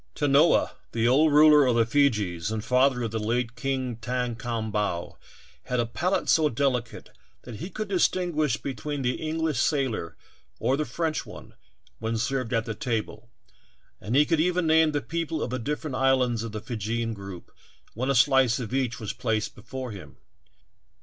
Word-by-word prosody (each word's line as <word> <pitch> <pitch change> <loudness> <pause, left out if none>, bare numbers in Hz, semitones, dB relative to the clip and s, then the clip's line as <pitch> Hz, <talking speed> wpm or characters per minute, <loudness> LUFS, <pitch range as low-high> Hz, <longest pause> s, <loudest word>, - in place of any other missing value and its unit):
Tanoa, 145 +2 +4 0.2
the 115 0 +1
old 150 +5 +4
ruler 150 -1 +7
of 125 - +2
the 115 -1 +4
Feejees 105 - +1
and 110 0 -3
father 125 0 +3
of 115 - -3
the 110 - -2
late 115 +2 -1
King 130 -1 -2
Thakom 115 -2 -3
bau, 105 -5 -2 0.5
had 125 - -1
a 120 - +2
palate 170 - -1
so 155 -2 +4
delicate 125 -2 -2 0.3
that 120 -3 -8
he 170 - -6
could 215 +1 -5
distin 180 -2 +1
guish 150 -7 0
between 140 +2 -4
the 125 0 -1
English 160 -3 -1
sailor 130 - -1 0.4
or 130 - +1
the 155 +2 -1
French 155 +4 -2
one - - -12 0.5
when 115 +1 -2
served 130 +1 -2
at 115 -1 0
the 115 - -3
table, 115 -3 -4 0.7
and 110 +6 -3
he 145 +2 +6
could 165 0 +1
even 180 +1 +1
name 160 0 +4
the 145 -1 -1
people 165 -2 -3
of 120 - -4
the 130 - -2
different 150 +3 -3
islands 130 -3 +2
of 115 -1 -5
the 110 -1 -5
Feejeean 115 +1 -3
group 100 -4 -9 0.4
when 130 +4 -2
a 140 - +2
slice 130 0 +4
of 120 -1 -5
each 130 -4 -1
was 110 -1 -4
placed 110 -3 -2
before 130 -2 -7
him. 100 -3 -11
125 Hz, 175 wpm, -26 LUFS, 115-145 Hz, 0.7 s, ruler